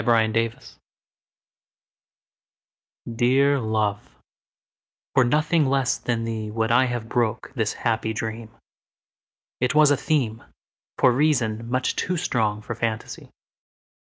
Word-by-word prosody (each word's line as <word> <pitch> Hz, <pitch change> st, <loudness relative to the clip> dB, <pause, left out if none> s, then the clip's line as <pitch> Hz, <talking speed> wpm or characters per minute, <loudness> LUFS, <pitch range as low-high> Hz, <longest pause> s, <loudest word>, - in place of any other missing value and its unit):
The 115 Hz, -2 st, +3 dB
Dream 115 Hz, 0 st, +1 dB, 2.6 s
DEAR 135 Hz, +4 st, +3 dB
love, 105 Hz, -, -2 dB, 1.0 s
for 130 Hz, -, +5 dB
nothing 150 Hz, +4 st, +2 dB
less 135 Hz, -1 st, +1 dB
than 115 Hz, -2 st, -2 dB
theeWould 110 Hz, 0 st, -2 dB
I 125 Hz, +2 st, +5 dB
have 120 Hz, -2 st, -3 dB
broke 120 Hz, -1 st, -1 dB
this 110 Hz, -5 st, -1 dB
happy 110 Hz, -1 st, -1 dB
dream; 110 Hz, 0 st, -5 dB, 1.1 s
It 125 Hz, +3 st, 0 dB
was 150 Hz, -1 st, +6 dB
a -, -, +5 dB
themeFor 125 Hz, -7 st, -1 dB, 0.7 s
reason, 120 Hz, -6 st, +1 dB
much 130 Hz, +1 st, 0 dB
too 180 Hz, 0 st, -1 dB
strong 110 Hz, -7 st, -1 dB
for 120 Hz, -, -5 dB
fantasy. 115 Hz, -1 st, -4 dB
115 Hz, 105 wpm, -24 LUFS, 110-130 Hz, 2.6 s, was